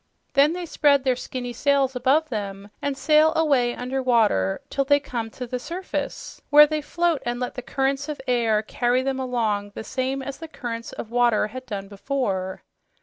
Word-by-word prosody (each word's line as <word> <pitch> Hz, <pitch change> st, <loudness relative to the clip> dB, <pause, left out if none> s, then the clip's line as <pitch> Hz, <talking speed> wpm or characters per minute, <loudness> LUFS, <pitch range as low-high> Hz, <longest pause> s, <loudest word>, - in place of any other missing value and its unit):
Then 285 Hz, +3 st, +5 dB
they 355 Hz, 0 st, -4 dB
spread 285 Hz, -4 st, +3 dB
their 260 Hz, -2 st, +2 dB
skinny 245 Hz, 0 st, -5 dB
sails 275 Hz, +1 st, +2 dB
above 275 Hz, +6 st, +2 dB
them 200 Hz, -2 st, -5 dB
and 285 Hz, -1 st, -2 dB
sail 310 Hz, +2 st, +4 dB
away 275 Hz, -7 st, +2 dB
under 255 Hz, +2 st, -3 dB
water 215 Hz, -, +2 dB
till 275 Hz, -, +1 dB
they 285 Hz, +1 st, +4 dB
come 240 Hz, -5 st, -4 dB
to 250 Hz, +3 st, -7 dB
the 250 Hz, +1 st, -4 dB
surface, 355 Hz, +8 st, -5 dB
where 295 Hz, +1 st, +9 dB
they 305 Hz, 0 st, -2 dB
float 340 Hz, 0 st, 0 dB
and 240 Hz, 0 st, -2 dB
let 250 Hz, -, -3 dB
the 250 Hz, -, -6 dB
currents 270 Hz, +3 st, -1 dB
of 300 Hz, -, -4 dB
air 230 Hz, -4 st, +2 dB
carry 245 Hz, +3 st, 0 dB
them 265 Hz, 0 st, -1 dB
along 220 Hz, -6 st, -1 dB
the -, -, -5 dB
same 260 Hz, +3 st, -2 dB
as 275 Hz, 0 st, -6 dB
the 325 Hz, -, -7 dB
currents 235 Hz, -6 st, -6 dB
of 225 Hz, -, -7 dB
water 240 Hz, -3 st, +3 dB
had 255 Hz, +3 st, -8 dB
done 200 Hz, -3 st, -5 dB
before. 195 Hz, -4 st, -3 dB
255 Hz, 190 wpm, -24 LUFS, 230-280 Hz, -, where